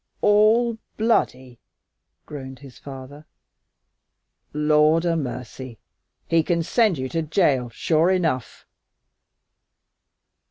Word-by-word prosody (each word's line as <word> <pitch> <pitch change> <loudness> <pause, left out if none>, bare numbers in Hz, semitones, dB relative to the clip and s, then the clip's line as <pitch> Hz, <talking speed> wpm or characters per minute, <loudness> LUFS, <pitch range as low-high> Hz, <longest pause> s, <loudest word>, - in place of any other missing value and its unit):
"All 220 +3 +3 0.2
bloody!" 130 - 0 0.7
groaned 130 -3 -9
his 135 -2 -14
father. 140 +2 -11 1.2
"Lord 150 +2 +3
'a 170 -1 +1
mercy! 125 -3 -6 0.5
He 165 0 +3
can 170 +1 -1
send 215 -1 +2
you 130 0 -3
to 165 - -2
jail, 150 -6 +1
sure 160 +8 +1
enough!" 160 -10 -1
155 Hz, 90 wpm, -23 LUFS, 130-175 Hz, 1.2 s, All